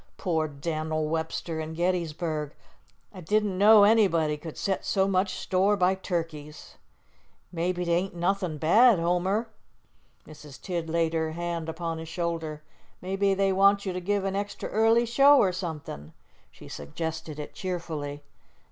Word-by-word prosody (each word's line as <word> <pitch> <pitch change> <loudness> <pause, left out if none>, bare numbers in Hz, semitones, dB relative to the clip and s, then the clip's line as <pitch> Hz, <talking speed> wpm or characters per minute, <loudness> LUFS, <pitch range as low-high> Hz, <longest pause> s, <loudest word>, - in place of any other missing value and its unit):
"Poor 160 -4 0
Dan'l 155 +1 -3
Webster 160 0 -3
an' 160 +1 -6
Gettysburg! 165 -3 -2 0.6
I 185 - -9
didn't 210 +2 0
know 205 +2 +7
anybody 190 -8 +3
could 155 +1 -9
set 195 -2 -2
so 190 0 +1
much 190 0 0
store 195 +2 +1
by 185 0 +3
turkeys." 165 -5 -5 0.7
"Maybe 175 +1 -2
't 170 - -1
ain't 175 +2 0
nothin' 180 -2 -1
bad, 215 - +5
Homer," 180 +6 0 0.8
Mrs. 150 -2 -13
Tidd 170 -3 -4
laid 165 0 0
her 160 -1 -1
hand 170 -1 -4
upon 165 0 -4
his 160 0 -8
shoulder. 165 -3 -4 0.4
"Maybe 195 +1 0
they 195 0 +2
want 200 +1 +4
you 190 - -2
to 180 - -4
give 200 +2 0
an 195 0 -2
extra 200 0 -4
early 225 +2 +3
show 275 +5 +6
or 190 -8 +4
somethin'." 155 - -6 0.4
She - - -15
suggested 160 - -6
it 150 - -7
cheerfully. 155 -6 -5
175 Hz, 145 wpm, -27 LUFS, 160-195 Hz, 0.8 s, know